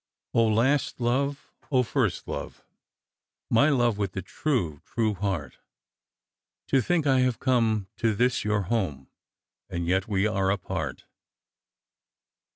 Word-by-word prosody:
" - - -63
last 115 +6 +2
love! 140 +4 -1 0.3
first - - -1
love! - - -6 0.9
My 140 +7 +5
love 120 -7 +2
with 100 -3 -1
the 95 - -4
true, 90 - -1
true 110 -2 0
heart! 95 -6 -3 1.1
To 135 - +4
think 170 +1 +1
I 135 -2 +4
have 125 -2 +2
come 115 -6 +1
to 115 -2 +1
this 125 +3 +1
your 105 -1 +1
home, 90 - -2 0.6
And 85 -1 -3
yet 95 +2 +1
we 100 -2 +1
are 95 -3 +1
apart." 90 -8 -3
110 Hz, 125 wpm, -27 LUFS, 95-125 Hz, 1.1 s, My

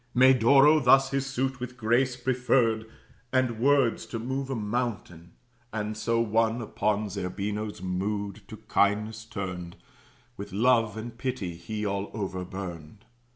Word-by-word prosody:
Medoro 130 +4 +6
thus 135 +2 +5
his 135 0 -1
suit, 135 0 -2
with 125 0 -6
grace, 120 +3 +2
preferred, 120 -3 +1 0.4
And 130 -3 +1
words 135 -2 +2
to 115 - -4
move 130 +4 -3
a 135 - -1
mountain; 105 -7 -3 0.4
and 110 0 -3
so 115 +2 0
won 115 +1 +1
Upon 105 -2 -1
Zerbino's 100 +1 -4
mood, 100 +2 -3
to 110 - -9
kindness 110 +1 0
turned, 90 -5 -6 0.6
With 100 -1 -8
love 115 0 +3
and 115 +1 -6
pity 120 -8 -3
he 105 +5 -5
all 100 0 -2
over 95 -4 -3
burned. 90 0 -8
110 Hz, 135 wpm, -27 LUFS, 100-125 Hz, 0.6 s, Medoro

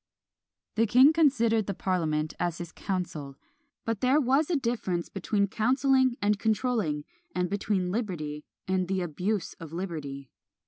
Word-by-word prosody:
The 225 +1 +4
king 260 +7 +7
considered 235 -9 +3
the 200 - -2
parliament 155 -5 0
as 175 -1 -1
his 175 -1 -7
council; 165 -8 -4 0.5
but 225 -3 -2
there 260 +4 +4
was 275 +3 +2
a 350 - +2
difference 230 - -1
between 200 +1 0
councilling 260 +4 +2
and 205 0 +2
controlling, 215 - 0 0.3
and 180 0 0
between 195 -3 0
liberty 165 -9 -3 0.2
and 185 -1 +1
the 190 0 0
abuse 180 +4 -2
of 165 -2 -9
liberty." 150 -7 -5
195 Hz, 140 wpm, -28 LUFS, 170-235 Hz, 0.5 s, king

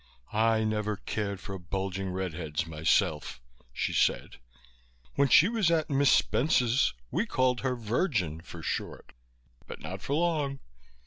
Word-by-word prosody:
"I 110 0 +3
never 105 -1 -1
cared 100 -2 -3
for 95 0 -7
bulging 95 +1 -3
red 95 -2 -3
heads 80 0 -3
myself," 80 -4 0 0.3
she - - -2
said. - - +1 0.8
"When 140 - +3
she 165 - +7
was 220 -6 +1
at 160 -3 +1
Miss 140 -1 +4
Spence's 125 - +2 0.2
we - - 0
called 130 -1 +1
her 130 -1 -1
Virgin 110 - -1
for 85 -1 -10
short, - - -4 0.5
but - - -8
not 95 +1 -7
for 140 - -2
long. 150 -5 0
105 Hz, 140 wpm, -29 LUFS, 90-135 Hz, 0.8 s, she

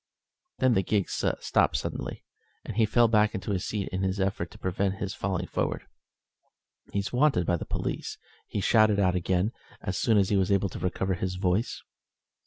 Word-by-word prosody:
Then 130 -2 +3
the 95 - +3
gig 100 0 0
stopped - - +1
suddenly, - - -5 0.4
and - - -6
he 110 -1 +3
fell 120 +2 +4
back 105 -1 +3
into 95 +1 -3
his 95 -2 -1
seat 105 -2 -2
in 95 +1 -3
his 95 +1 -1
effort 95 -3 -1
to - - -14
prevent 95 +1 -1
his 95 0 -4
falling 95 -2 -2
forward. - - -2 1.1
"He's 100 +3 -2
wanted 130 - +3
by 85 - +2
the - - -6
police," - - -3 0.3
he 100 - -3
shouted 110 0 +4
out 95 -2 +3
again, 90 +3 +1 0.3
as 95 - -3
soon 115 -3 +3
as 95 -2 +3
he 100 - +3
was 95 0 +1
able 100 0 +2
to - - -7
recover 95 +1 -1
his 95 +1 -2
voice. 90 +4 0
95 Hz, 190 wpm, -28 LUFS, 95-105 Hz, 1.1 s, fell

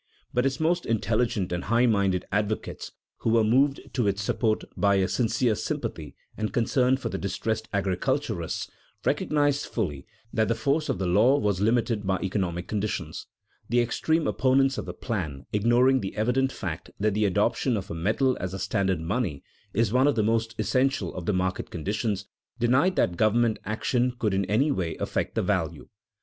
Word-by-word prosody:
But 125 +2 +2
its 135 - -2
most 175 +2 +1
intelligent 110 -3 0
and 90 0 -2
high 120 +3 +3
minded 100 -5 +2
advocates 105 +2 -2 0.3
(who - - -1
were 115 0 +4
moved 135 +6 +3
to 120 -4 +1
its 100 0 0
support 110 +1 0
by 100 -1 +3
a 95 -1 +2
sincere 120 +1 +1
sympathy - - -4 0.2
and 110 0 -2
concern 125 +2 +2
for 135 - -4
the - - -4
distressed 110 +3 -2
agriculturalists) 95 -3 -1 0.3
recognized 145 -1 +1
fully 75 - -3 0.3
that 110 -1 +2
the 115 - +1
force 140 +7 0
of - - 0
the 95 - -2
law 105 +10 +4
was 100 -6 0
limited 115 -2 +1
by 95 0 +2
economic 90 -2 -2
conditions. 105 0 -3 0.4
The 120 +2 +3
extreme 160 +7 +1
opponents 130 +5 +2
of - - -6
the - - -4
plan, 80 - -4
ignoring 120 +5 +4
the 95 -2 -5
evident 125 +5 +1
fact 85 -10 -5
that 105 0 +1
the 105 +1 +1
adoption 115 +5 +1
of 100 -1 -6
a - - -2
metal 110 +10 +1
as 95 +1 -4
a - - -3
standard 95 -3 0
money 90 - -2 0.3
is 115 -2 +1
one 130 +2 +4
of 145 - +2
the 110 - +2
most 115 +1 0
essential 110 -1 +1
of 90 -2 -6
the 105 - +2
market 95 0 -1
conditions, 100 +4 -2 0.3
denied 130 +10 +3
that 85 -1 +1
government 110 +2 +2
action 120 +4 0
could 105 -4 0
in 95 0 +1
any 125 +10 +2
way 90 -10 -2
affect - - -2
the - - +1
value. - - -1
110 Hz, 180 wpm, -26 LUFS, 95-125 Hz, 0.4 s, were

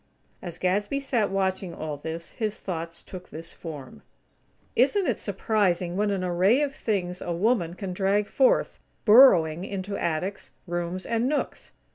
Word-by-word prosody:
As 175 -3 -6
Gadsby 205 +8 0
sat 245 -7 0
watching 190 -2 -1
all 155 -1 -4
this 160 +3 -6
his 215 -2 -3
thoughts 170 -2 -5
took 180 -1 -10
this 165 +2 -9
form: 140 - -9 0.7
"Isn't 355 - +3
it - - 0
surprising 190 -4 0
what 205 +2 +1
an 195 -2 -1
array 185 +10 +3
of 280 -2 -2
things 185 -8 -2
a 175 - -3
woman 175 -1 +1
can 190 -1 -5
drag 200 +2 +1
forth, - - +2 0.3
burrowing 185 - +7
into 200 0 -4
attics, 180 +3 -2 0.2
rooms 175 +1 -3
and 230 +2 0
nooks! 300 - -3
190 Hz, 150 wpm, -26 LUFS, 170-210 Hz, 0.7 s, burrowing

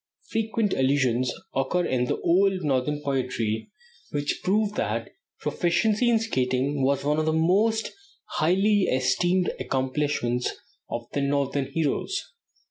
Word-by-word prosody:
Frequent 220 -2 0
allusions 130 -2 +2 0.2
occur 170 +7 0
in 125 -1 +1
the - - -2
old 185 +1 +3
Northern 145 +1 0
poetry, 125 -5 -1 0.4
which 145 0 -2
prove 210 +2 +1
that - - -2 0.3
proficiency 210 +7 +1
in 235 - +4
skating 135 - 0
was 140 +1 +1
one 150 +2 +1
of 155 - 0
the - - +3
most 205 +8 +2 0.3
highly 195 +5 +2
esteemed 175 +8 +1
accomplishments 130 -2 -1 0.4
of 120 - -3
the 140 - 0
Northern 140 -1 0
heroes. 165 - -2
150 Hz, 125 wpm, -26 LUFS, 130-190 Hz, 0.4 s, in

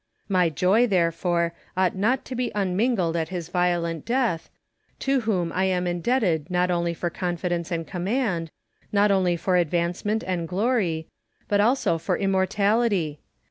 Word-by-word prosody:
My 180 -4 +3
joy, 190 - +3
therefore, 170 -2 +1 0.2
ought 185 -1 +2
not 220 +7 +1
to - - -6
be 250 0 -2
unmingled 195 -2 +1
at 165 -1 -1
his 175 -3 -5
violent 175 -2 0
death, 235 -9 0 0.5
to 270 0 +1
whom 185 -7 -1
I 190 +1 +1
am 180 -1 0
indebted 175 - 0
not 180 0 +1
only 170 -1 0
for 175 +1 -3
confidence 175 -1 -2
and 165 -2 -2
command, 180 -2 -1 0.4
not 205 0 +3
only 185 -3 +2
for 180 +2 +1
advance 170 +1 0
ment 215 +2 0
and 175 -3 -2
glory, 185 -4 0 0.4
but 205 0 +3
also 225 -7 +2
for - - -1
immortality. 195 -3 +1
180 Hz, 150 wpm, -25 LUFS, 170-205 Hz, 0.5 s, My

